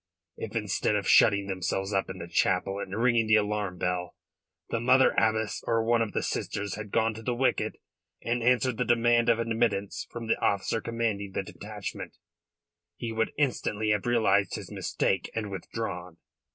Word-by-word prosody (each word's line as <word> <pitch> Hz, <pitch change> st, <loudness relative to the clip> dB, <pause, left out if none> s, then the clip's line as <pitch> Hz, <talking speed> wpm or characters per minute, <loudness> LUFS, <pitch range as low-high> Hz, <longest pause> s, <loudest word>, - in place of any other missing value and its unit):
If 110 Hz, +1 st, -7 dB
instead 105 Hz, -1 st, 0 dB
of 100 Hz, -2 st, -1 dB
shutting 100 Hz, -3 st, +5 dB
themselves 95 Hz, +1 st, -2 dB
up 95 Hz, 0 st, 0 dB
in 95 Hz, -, -6 dB
the 85 Hz, -1 st, -7 dB
chapel 95 Hz, +3 st, +1 dB
and 100 Hz, +2 st, -4 dB
ringing 115 Hz, -2 st, +3 dB
the 110 Hz, -, +5 dB
alarm 105 Hz, -3 st, 0 dB
bell 90 Hz, 0 st, -2 dB, 0.5 s
the 115 Hz, -, -1 dB
Mother 130 Hz, +3 st, +5 dB
Abbess 110 Hz, -1 st, +1 dB
or 115 Hz, -1 st, +2 dB
one 115 Hz, 0 st, +2 dB
of 110 Hz, -2 st, -2 dB
the -, -, -1 dB
sisters 105 Hz, -1 st, -3 dB
had 105 Hz, -1 st, -6 dB
gone 110 Hz, +2 st, +1 dB
to 110 Hz, -, -9 dB
the 120 Hz, +2 st, -1 dB
wicket 130 Hz, +2 st, +1 dB, 0.5 s
and 120 Hz, +1 st, -1 dB
answered 125 Hz, 0 st, +2 dB
the 125 Hz, -, +1 dB
demand 120 Hz, 0 st, +3 dB
of 115 Hz, -, +4 dB
admittance 115 Hz, -3 st, -1 dB
from 120 Hz, -1 st, -6 dB
the 115 Hz, -, +1 dB
officer 100 Hz, +2 st, +1 dB
commanding 110 Hz, -4 st, -2 dB
the -, -, -1 dB
detachment, 105 Hz, 0 st, -7 dB, 0.8 s
he 115 Hz, -, -5 dB
would 115 Hz, 0 st, 0 dB
instantly 110 Hz, -6 st, 0 dB
have 105 Hz, +2 st, 0 dB
realised 110 Hz, -5 st, +2 dB
his -, -, -7 dB
mistake 95 Hz, -, -1 dB
and 105 Hz, -3 st, -3 dB
withdrawn." 90 Hz, -4 st, -5 dB
110 Hz, 175 wpm, -28 LUFS, 100-115 Hz, 0.8 s, shutting